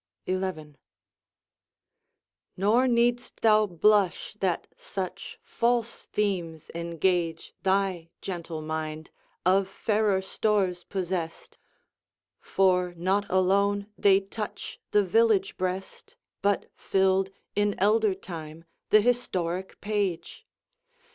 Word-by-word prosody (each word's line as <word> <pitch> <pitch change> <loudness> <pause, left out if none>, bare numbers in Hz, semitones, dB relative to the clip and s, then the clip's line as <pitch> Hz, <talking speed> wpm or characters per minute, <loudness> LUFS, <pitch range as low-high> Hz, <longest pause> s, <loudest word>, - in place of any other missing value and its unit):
XI 185 -6 -3 1.8
Nor 220 +7 +3
need'st 240 0 +1
thou 215 -1 +5
blush, 195 +1 +2
that 185 -3 0
such 190 0 -6
false 235 -1 -1
themes 175 -7 -2
engage 170 0 -1
Thy 190 -3 0
gentle 170 -4 -5
mind, 155 0 -4 0.3
of 190 +1 +4
fairer 205 0 +1
stores 190 -3 0
possessed; 180 -3 -4 0.8
For 180 -2 +1
not 195 +4 +1
alone 200 +2 +2
they 195 -1 +5
touch 200 +2 -7
the 210 - +4
village 210 0 +3
breast, 185 +1 -4 0.3
But 200 0 +1
filled 190 0 +2 0.3
in 205 0 +1
elder 210 0 +3
time 165 -4 -8 0.3
th' 215 -1 +6
historic 190 -7 -1
page. 205 -5 -2
190 Hz, 95 wpm, -27 LUFS, 175-205 Hz, 1.8 s, th